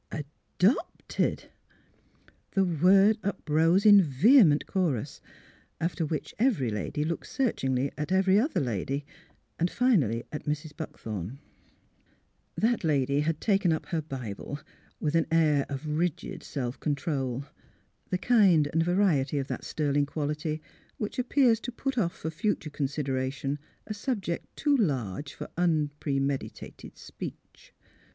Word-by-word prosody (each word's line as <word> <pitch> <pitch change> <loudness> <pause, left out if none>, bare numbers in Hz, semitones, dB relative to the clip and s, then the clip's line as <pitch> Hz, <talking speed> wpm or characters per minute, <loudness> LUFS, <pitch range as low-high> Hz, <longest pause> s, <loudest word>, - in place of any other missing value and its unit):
"Adopted! 175 - -1 0.5
" - - -33
The 195 - +4
word 190 +5 +4
uprose 175 -1 +2
in 205 -2 +9
vehement 165 - +5
chorus. 165 - -1 0.6
After 165 -1 -1
which 155 0 -4
every 205 - +2
lady 105 +8 -2
looked 165 +1 -3
searchingly 135 - 0
at 150 +4 -3
every 190 +1 +4
other 280 +8 +1
lady, 135 +3 -2 0.5
and 170 +2 +2
finally 155 - +2
at 150 - -6
Mrs. 150 +1 -3
Buckthorn. 110 - -6 1.2
That 230 -1 +1
lady 140 -3 +2
had 155 +1 0
taken 195 -5 +2
up 160 - -1
her 165 -4 0
Bible, 135 -2 -6 0.4
with 150 -1 -1
an 165 -1 +2
air 155 -4 +3
of 140 +1 -5
rigid 155 +2 -2
self 125 -3 -4
control 140 -4 -2 0.3
— - - -40
the 185 - +1
kind 190 -9 +4
and 165 - +3
variety 165 -6 +2
of 135 -1 -2
that - - -4
sterling 145 -2 0
quality 150 +1 -3 0.3
which 210 +3 -4
appears 250 -2 +3
to 245 - -5
put 270 +3 -3
off 170 -5 0
for 160 - -4
future 165 -2 -2
consideration 140 0 -2 0.3
a 215 - -4
subject 205 -6 -3
too 290 -1 +2
large 140 - -1
for - - -6
un 160 -4 +2
premeditated 140 -1 -3
speech. - - -10
155 Hz, 130 wpm, -28 LUFS, 140-190 Hz, 1.2 s, in